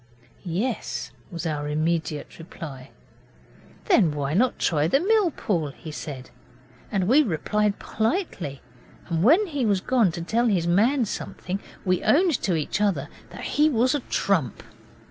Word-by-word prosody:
'Yes,' 185 Hz, -, -3 dB, 0.2 s
was 170 Hz, -1 st, -6 dB
our 150 Hz, -2 st, -2 dB
immediate 155 Hz, 0 st, -2 dB
reply. 145 Hz, -6 st, -9 dB, 1.0 s
'Then 225 Hz, -, +4 dB
why 140 Hz, 0 st, -2 dB
not 240 Hz, +8 st, +2 dB
try 155 Hz, -2 st, +1 dB
the 275 Hz, -, +3 dB
mill 415 Hz, +1 st, +3 dB
pool?' 175 Hz, -, -1 dB
he 155 Hz, -, -8 dB
said, 135 Hz, -4 st, -7 dB, 0.6 s
and 190 Hz, -3 st, 0 dB
we 270 Hz, +7 st, +6 dB
replied 210 Hz, -, 0 dB
politely; 220 Hz, -, -2 dB, 0.5 s
and 165 Hz, -2 st, 0 dB
when 330 Hz, -, +6 dB
he 290 Hz, -8 st, -2 dB
was 205 Hz, -4 st, +2 dB
gone 230 Hz, -3 st, +2 dB
to 170 Hz, -, -5 dB
tell 235 Hz, +7 st, +1 dB
his 185 Hz, -6 st, +1 dB
man 225 Hz, +9 st, +3 dB
something 195 Hz, -1 st, -5 dB, 0.3 s
we 185 Hz, -1 st, +2 dB
owned 335 Hz, 0 st, +3 dB
to 180 Hz, -, +1 dB
each 160 Hz, +6 st, -2 dB
other 170 Hz, -8 st, 0 dB, 0.2 s
that -, -, -9 dB
he 300 Hz, +1 st, +3 dB
was 255 Hz, -1 st, +2 dB
a 290 Hz, -, +1 dB
trump. 180 Hz, -, -1 dB
190 Hz, 150 wpm, -25 LUFS, 160-250 Hz, 1.0 s, we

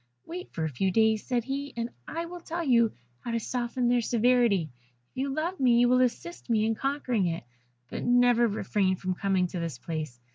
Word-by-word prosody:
'Wait 360 Hz, +2 st, -7 dB
for 160 Hz, -, -3 dB
a -, -, +1 dB
few 170 Hz, +8 st, 0 dB
days,' 220 Hz, +2 st, +3 dB
said 245 Hz, -3 st, 0 dB
he, 275 Hz, +3 st, -4 dB
'and 235 Hz, +1 st, -2 dB, 0.2 s
I 335 Hz, +1 st, -3 dB
will 350 Hz, +1 st, -8 dB
tell 340 Hz, 0 st, -4 dB
you 235 Hz, -6 st, +4 dB, 0.3 s
how -, -, -7 dB
to 230 Hz, 0 st, 0 dB
soften 245 Hz, +1 st, -2 dB
their 245 Hz, 0 st, +3 dB
severity. 230 Hz, -, +2 dB, 0.4 s
If -, -, -22 dB
you 270 Hz, +2 st, -1 dB
love 330 Hz, +6 st, -2 dB
me 245 Hz, -3 st, +4 dB
you 245 Hz, 0 st, +5 dB
will 250 Hz, 0 st, +4 dB
assist 255 Hz, +6 st, -2 dB
me 220 Hz, -2 st, +3 dB
in 225 Hz, -, +1 dB
conquering 250 Hz, -6 st, 0 dB
it; 165 Hz, 0 st, -3 dB, 0.4 s
but -, -, -5 dB
never 245 Hz, -1 st, +4 dB
refrain 200 Hz, -2 st, 0 dB
from 185 Hz, 0 st, -2 dB
coming 190 Hz, 0 st, +1 dB
to 180 Hz, -, -4 dB
this 165 Hz, -7 st, -4 dB
place. 155 Hz, -5 st, -5 dB
235 Hz, 210 wpm, -28 LUFS, 195-255 Hz, 0.4 s, you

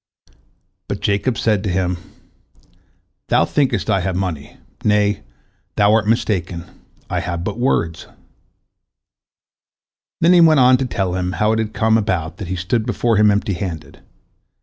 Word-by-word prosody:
But 100 Hz, -, -4 dB
Jacob 105 Hz, +3 st, 0 dB
said 105 Hz, -3 st, +1 dB
to 105 Hz, -, -2 dB
him: 90 Hz, 0 st, -1 dB, 1.3 s
"Thou -, -, +3 dB
thinkest 140 Hz, -3 st, 0 dB
I 100 Hz, -, +2 dB
have 95 Hz, 0 st, -2 dB
money. 85 Hz, -6 st, -4 dB, 0.3 s
Nay, 105 Hz, -1 st, +2 dB, 0.5 s
thou 105 Hz, +1 st, +4 dB
art 110 Hz, -1 st, +2 dB
mistaken, 90 Hz, -6 st, -1 dB, 0.4 s
I -, -, -2 dB
have 85 Hz, 0 st, -4 dB
but 105 Hz, +5 st, -4 dB
words." 85 Hz, -10 st, -1 dB, 2.1 s
Then 170 Hz, +2 st, +5 dB
he 175 Hz, -, +6 dB
went 160 Hz, -3 st, +6 dB
on 125 Hz, 0 st, +6 dB
to 135 Hz, -, -2 dB
tell 95 Hz, -6 st, -2 dB
him 90 Hz, 0 st, -2 dB
how 105 Hz, +5 st, +1 dB
it 110 Hz, -, +1 dB
had 110 Hz, -1 st, -3 dB
come 110 Hz, 0 st, +3 dB
about 90 Hz, -6 st, -2 dB
that 100 Hz, -, -6 dB
he 95 Hz, -, -3 dB
stood 95 Hz, +6 st, -1 dB
before 120 Hz, -2 st, +1 dB
him 105 Hz, 0 st, +5 dB
empty 100 Hz, -1 st, 0 dB
handed. 90 Hz, -4 st, -6 dB
100 Hz, 150 wpm, -19 LUFS, 90-110 Hz, 2.1 s, he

